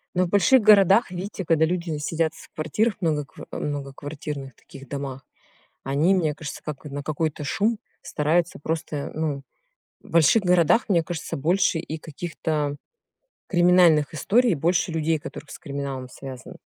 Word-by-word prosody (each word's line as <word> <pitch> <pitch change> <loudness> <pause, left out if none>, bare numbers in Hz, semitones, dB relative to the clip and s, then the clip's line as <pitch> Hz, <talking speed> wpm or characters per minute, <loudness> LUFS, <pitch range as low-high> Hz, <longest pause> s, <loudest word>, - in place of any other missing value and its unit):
Ну, 180 +1 +3
в - - -5
больших 210 +6 +5
городах, 200 0 +6
видите, 190 +1 -5
когда 160 -1 +3
люди 170 -2 -2
сидят 160 +2 -1
в 185 - -14
квартирах 195 +8 0
многокв 150 -5 -2
э, - - -5
многоквартирных 145 -1 -5
таких 135 -1 -14
домах. 135 -2 -5 0.6
Они, 150 +8 +2
мне 160 -5 +1
кажется, 150 -1 -7
как 150 -3 -6
на 145 0 -5
какой-то 155 0 -2
шум 210 +10 0 0.2
стараются 165 +3 0
просто, 160 +1 -3
э, 140 - -4
ну. 150 -3 -2 0.6
В - - -16
больших 170 +7 +5
городах, 180 +5 +3
мне 170 -4 +4
кажется, 165 0 -5
больше 170 +4 +2
и 160 -1 -5
каких-то 155 -2 -3 0.7
криминальных 175 -5 +4
историй, 230 - +3
больше 170 +3 +1
людей, 160 0 +1
которых 145 - -9
с - - -8
криминалом 140 -4 -5
связаны. 130 -1 -10
160 Hz, 150 wpm, -24 LUFS, 145-180 Hz, 0.7 s, городах